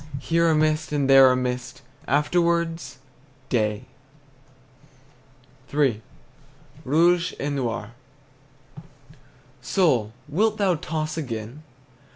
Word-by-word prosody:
Here 165 Hz, +4 st, +1 dB
a 160 Hz, -, +3 dB
mist, 155 Hz, 0 st, 0 dB
and 145 Hz, -2 st, 0 dB
there 135 Hz, -1 st, +7 dB
a -, -, +2 dB
mist, 125 Hz, +1 st, -4 dB, 0.2 s
Afterwards 165 Hz, -1 st, 0 dB, 0.5 s
day! 105 Hz, -3 st, -1 dB, 1.9 s
III. 135 Hz, -7 st, +1 dB, 0.8 s
ROUGE 170 Hz, +5 st, +2 dB
ET 145 Hz, +1 st, -2 dB
NOIR. 120 Hz, -5 st, -3 dB, 1.7 s
Soul, 130 Hz, -, +1 dB, 0.2 s
wilt 210 Hz, +8 st, 0 dB
thou 195 Hz, -3 st, +2 dB
toss 155 Hz, -1 st, -4 dB
again? 120 Hz, -1 st, -6 dB
145 Hz, 90 wpm, -24 LUFS, 125-165 Hz, 1.9 s, there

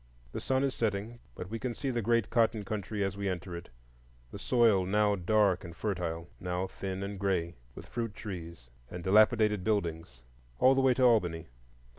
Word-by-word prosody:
The -, -, -5 dB
sun 130 Hz, 0 st, +1 dB
is 135 Hz, -1 st, 0 dB
setting, 110 Hz, +1 st, -2 dB, 0.2 s
but 90 Hz, +2 st, -7 dB
we 115 Hz, -, -3 dB
can 125 Hz, -1 st, -3 dB
see 135 Hz, -, -2 dB
the 120 Hz, -1 st, -1 dB
great 115 Hz, -1 st, +1 dB
cotton 115 Hz, -3 st, +2 dB
country 105 Hz, 0 st, -3 dB
as 95 Hz, -1 st, -2 dB
we 100 Hz, -1 st, -2 dB
enter 90 Hz, -1 st, -4 dB
it,—the -, -, -14 dB
soil 115 Hz, -6 st, +3 dB
now 105 Hz, +1 st, +3 dB
dark 100 Hz, 0 st, +2 dB
and 85 Hz, -2 st, -9 dB
fertile, 85 Hz, -5 st, -3 dB
now 90 Hz, +1 st, -2 dB
thin 95 Hz, 0 st, -5 dB
and 100 Hz, 0 st, -5 dB
gray, 90 Hz, -4 st, 0 dB, 0.2 s
with -, -, -9 dB
fruit 115 Hz, -3 st, -4 dB
trees 85 Hz, -, -8 dB, 0.2 s
and 90 Hz, -1 st, -7 dB
dilapidated 105 Hz, 0 st, +4 dB
buildings,—all 80 Hz, -, -1 dB
the 135 Hz, -, +2 dB
way 130 Hz, -1 st, +4 dB
to 130 Hz, -, +1 dB
Albany. 90 Hz, -, +2 dB
100 Hz, 175 wpm, -30 LUFS, 85-110 Hz, 0.2 s, dilapidated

